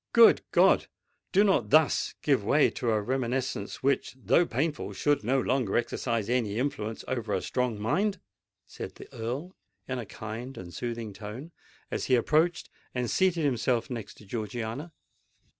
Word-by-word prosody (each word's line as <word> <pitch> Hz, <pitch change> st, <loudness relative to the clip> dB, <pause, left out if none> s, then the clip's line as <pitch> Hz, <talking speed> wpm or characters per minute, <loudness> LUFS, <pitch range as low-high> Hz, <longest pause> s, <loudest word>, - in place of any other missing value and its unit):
"Good 235 Hz, -1 st, +8 dB
God! -, -, +5 dB, 0.4 s
do 200 Hz, +2 st, +5 dB
not 195 Hz, -2 st, +2 dB
thus 155 Hz, -1 st, +3 dB
give 135 Hz, -8 st, +3 dB
way 140 Hz, +8 st, +4 dB
to 120 Hz, -, -2 dB
a 110 Hz, -1 st, +3 dB
reminiscence 125 Hz, -1 st, -2 dB
which, 135 Hz, -1 st, +1 dB
though 170 Hz, +6 st, +3 dB
painful, 145 Hz, +5 st, -2 dB
should 145 Hz, -5 st, +1 dB
no 130 Hz, +5 st, +2 dB
longer 130 Hz, -5 st, +1 dB
exercise 115 Hz, -2 st, -1 dB
any 115 Hz, -4 st, 0 dB
influence 115 Hz, -4 st, -2 dB
over 115 Hz, -5 st, -1 dB
a -, -, -1 dB
strong 125 Hz, -4 st, -1 dB
mind!" 190 Hz, -, 0 dB, 0.5 s
said -, -, -8 dB
the -, -, -11 dB
Earl, 130 Hz, +11 st, -4 dB, 0.3 s
in 130 Hz, -1 st, -2 dB
a 115 Hz, -, -6 dB
kind 110 Hz, +6 st, -7 dB
and 90 Hz, -2 st, -8 dB
soothing 115 Hz, -3 st, -4 dB
tone, 115 Hz, -, -8 dB, 0.4 s
as -, -, -2 dB
he 130 Hz, -, +4 dB
approached 155 Hz, +8 st, +2 dB, 0.3 s
and 125 Hz, -1 st, -1 dB
seated 175 Hz, -4 st, +2 dB
himself 120 Hz, -2 st, +1 dB
next 115 Hz, -4 st, -6 dB
to 105 Hz, -, -15 dB
Georgiana. 115 Hz, -, -4 dB
125 Hz, 160 wpm, -28 LUFS, 110-145 Hz, 0.5 s, Good